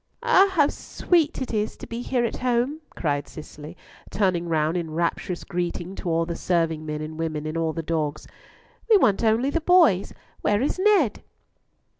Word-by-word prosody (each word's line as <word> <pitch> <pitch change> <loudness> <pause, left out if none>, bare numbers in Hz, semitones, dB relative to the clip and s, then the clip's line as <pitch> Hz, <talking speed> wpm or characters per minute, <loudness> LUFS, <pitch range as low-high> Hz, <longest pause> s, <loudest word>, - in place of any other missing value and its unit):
"Ah, 390 +1 +5
how 300 -6 +4
sweet 325 0 0
to 220 -5 -3
be 235 +1 -5
here 245 -1 0
at 230 - -3
home," 255 +5 0
cried 145 -3 -1
Cicely, 155 +1 -10 0.3
turning 185 -4 0
round 160 0 +1
in 170 -2 -2
rapturous 170 +2 -2
greeting 175 +1 -4
to 185 - -5
all 165 0 +1
the 170 - -4
serving 165 -3 -1
men 150 0 -3
and 155 +1 -7
women, 155 -2 -3
and 155 +1 -4
all 165 -1 0
the 165 +1 -5
dogs. 155 -2 -2 0.6
"We 435 - +7
want 210 - +2
only 230 +5 +2
the 335 - -1
boys! 315 - +4 0.3
Where 205 0 +2
is 295 - -1
Ned?" 375 - +3
180 Hz, 170 wpm, -24 LUFS, 160-245 Hz, 0.6 s, We